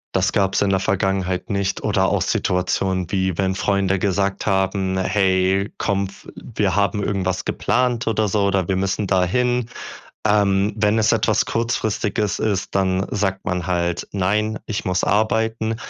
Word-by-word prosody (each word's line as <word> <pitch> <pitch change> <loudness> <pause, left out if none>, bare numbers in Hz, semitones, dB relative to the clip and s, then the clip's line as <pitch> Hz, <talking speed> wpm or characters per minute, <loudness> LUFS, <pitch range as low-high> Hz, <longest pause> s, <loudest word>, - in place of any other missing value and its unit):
Das - - +2
gab's 95 -1 +1
in 100 - +2
der 95 -1 +2
Vergangenheit 95 0 -1
nicht 100 -1 -1
oder - - +2
auch - - +1
Situationen, 90 0 0
wie 95 -3 0
wenn 95 -1 +1
Freunde 95 -1 0
gesagt 100 0 0
haben: 95 -1 0
„Hey, 95 +1 +1
komm, 100 -1 0
w 100 - -14 0.3
wir 95 - +1
haben 100 0 +1
irgendwas 95 -2 -1
geplant 120 -1 0
oder 110 -1 +1
so 100 +1 +1
oder 95 -2 0
wir 95 - +1
müssen 95 +2 -1
da 95 -1 +2
hin." 125 +4 0 0.6
Ähm, 100 -1 +2
wenn 105 +1 +2
es 110 - +3
etwas 110 -2 +2
Kurzfristiges 110 -2 -1
ist, 100 -3 -1
dann 95 0 +1
sagt 95 -2 -1
man 90 -3 -2
halt: 85 -1 -1
„Nein, 105 +3 0
ich 110 -2 -3
muss 90 0 0
arbeiten." 110 +1 +1
100 Hz, 160 wpm, -21 LUFS, 95-105 Hz, 0.6 s, es